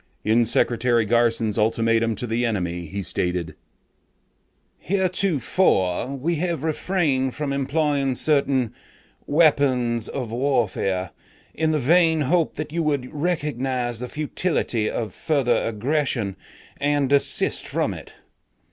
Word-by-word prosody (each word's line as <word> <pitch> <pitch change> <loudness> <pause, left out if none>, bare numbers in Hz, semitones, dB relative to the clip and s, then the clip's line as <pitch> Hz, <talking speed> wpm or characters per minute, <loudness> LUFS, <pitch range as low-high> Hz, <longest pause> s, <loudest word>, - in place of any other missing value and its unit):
"In 115 +2 +3
Secretary 120 0 +2
Garson's 115 -1 +2
ultimatum 115 +1 +2
to 125 - -3
the 115 +1 -1
enemy, 90 -7 -2
he 100 +5 -5
stated: 90 -3 -2 1.3
'Heretofore 175 - +1
we 160 +5 -1
have 170 -2 -2
refrained 155 -5 0
from 145 -2 -2
employing 140 -1 0
certain 135 -5 +1 0.5
weapons 130 -7 +2
of 125 -5 -4
warfare 115 -7 0 0.4
in 160 0 0
the 155 - +1
vain 160 +3 +3
hope 165 +3 +1
that 155 0 -5
you 170 - 0
would 145 -3 -1
recognize 135 -7 -2
the 125 0 -5
futility 150 -7 -1
of 110 -5 -4
further 135 -6 +1
aggression 115 -3 -1 0.4
and 145 -1 +1
desist 140 -1 +1
from - - -1
it. - - -10
130 Hz, 115 wpm, -23 LUFS, 115-150 Hz, 1.3 s, In